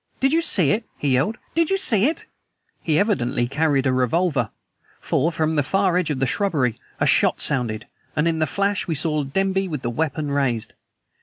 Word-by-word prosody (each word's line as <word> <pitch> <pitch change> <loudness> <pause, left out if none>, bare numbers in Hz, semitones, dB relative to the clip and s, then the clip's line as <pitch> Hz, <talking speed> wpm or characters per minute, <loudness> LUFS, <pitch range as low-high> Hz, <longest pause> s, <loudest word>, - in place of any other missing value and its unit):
"Did 270 +2 +2
you 330 - +3
see 180 - +4
it?" 225 - 0
he 145 - -1
yelled. 135 - +1 0.2
"Did 330 0 +1
you 390 - +2
see 225 - +3
it?" 320 - -3 0.6
He 155 -2 0
evidently 125 - 0
carried 140 0 +1
a 130 - +2
revolver. 130 - +1 0.5
For 165 - 0
from 160 -1 -1
the 185 +7 +1
edge 180 -3 +1
of 150 - -1
the 135 - 0
shrubbery 135 - 0 0.2
a - - +2
shot - - +3
sounded, 120 -7 -1 0.3
and 155 +2 +1
in 165 -1 0
the 155 - +1
flash 200 +5 -1
we 165 - -1
saw 150 0 0
Denby 195 +6 -1
with 150 -6 -5
the 120 - -2
weapon 150 +1 -2
raised. 130 -6 -1
155 Hz, 195 wpm, -22 LUFS, 135-195 Hz, 0.6 s, see